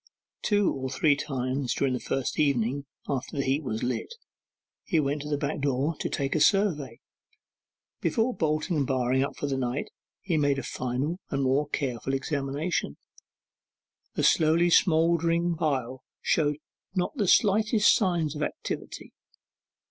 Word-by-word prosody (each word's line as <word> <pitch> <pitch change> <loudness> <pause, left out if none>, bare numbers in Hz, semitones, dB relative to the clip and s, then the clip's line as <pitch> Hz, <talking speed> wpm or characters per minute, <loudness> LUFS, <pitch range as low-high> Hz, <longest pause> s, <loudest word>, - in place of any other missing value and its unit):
Two 205 -2 +2
or 130 -1 -4
three 145 +2 +3
times 130 -2 -2
during 135 -2 +1
the 125 - -1
first 135 -2 -2
evening 140 -1 +1 0.2
after 140 0 -3
the 140 - +1
heap 135 +3 +1
was 110 -6 -3
lit, 125 - -2 0.7
he 165 - +1
went 145 0 0
to 150 - -6
the 145 - 0
back 145 +1 -2
door 140 +3 0
to - - -2
take 140 -1 -1
a - - +1
survey. 150 - +2 1.0
Before 240 +1 +1
bolting 155 0 0
and 140 -3 0
barring 130 0 +1
up 140 - -4
for - - -3
the 135 -2 -1
night, 125 +2 -2 0.3
he 175 -5 -1
made 145 -2 +2
a 135 - -3
final 130 +8 -2
and 135 -2 -1
more 140 +3 +1
careful 135 -2 -2
examination. 140 - -2 1.2
The - - 0
slowly 165 +2 +4
smoking 170 +1 +3
pile 130 -6 -2 0.2
showed 150 -2 +1 0.4
not 180 +9 -1
the 205 -5 +1
slightest 215 +2 +4
signs 175 - 0
of 150 - -5
activity. - - -5
145 Hz, 150 wpm, -27 LUFS, 135-165 Hz, 1.2 s, slowly